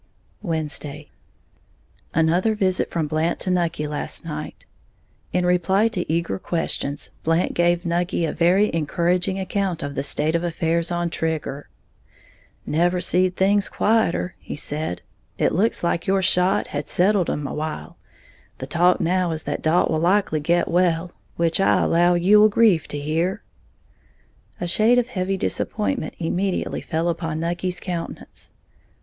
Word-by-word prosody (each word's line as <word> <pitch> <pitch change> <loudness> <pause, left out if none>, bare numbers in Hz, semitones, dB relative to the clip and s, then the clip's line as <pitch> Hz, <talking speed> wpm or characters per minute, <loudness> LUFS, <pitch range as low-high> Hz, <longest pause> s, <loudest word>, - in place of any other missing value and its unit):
Wednesday. 155 -4 -4 1.0
Another 175 +7 +2
visit 185 -3 0
from 165 -2 -1
Blant 155 +3 -1
to 185 - -1
Nucky 170 -4 0
last 150 0 -4
night. 75 0 -7 0.7
In 180 0 +1
reply 190 +5 +2
to 180 -7 -3
eager 170 +3 -1
questions, 145 -5 -2
Blant 165 +2 +1
gave 175 0 +1
Nucky 170 0 0
a 155 - -2
very 185 +5 +3
encouraging 175 +4 0
account 190 -3 -2
of 145 0 -4
the 135 - -2
state 150 +2 0
of 170 0 0
affairs 170 0 0
on 175 -1 -1
Trigger. 155 -4 -3 1.0
"Never 175 +3 +1
seed 180 +1 +2
things 200 +1 +2
quieter," 210 -5 +1
he - - -7
said; 145 - -3 0.3
"it - - +2
looks 210 +3 +1
like 170 0 -1
your 195 0 +2
shot 180 +1 +2
had 145 0 -4
settled 190 0 +2
'em 145 - -2
a - - -4
while. 155 0 -5 0.6
The 130 - -6
talk 175 +5 +3
now 180 +1 +1
is 160 -1 -3
that - - -3
Dalt 160 +3 +2
will 155 - +1
likely 180 -1 +2
get 170 +4 +1
well, 175 0 +1 0.2
which 170 +1 +1
I 195 - +3
allow 175 +1 +3
you 190 +5 +5
will 215 +1 +6
grieve 205 -6 +3
to 145 - -5
hear." 160 +6 -1 1.2
A - - -2
shade 215 +8 +3
of 245 0 +1
heavy 195 -4 -2
disappointment 225 +7 -2
immediately 180 +3 -2
fell 165 0 -2
upon 165 -2 -2
Nucky's 175 +2 -2
countenance. 175 -3 -6
175 Hz, 150 wpm, -22 LUFS, 160-185 Hz, 1.2 s, will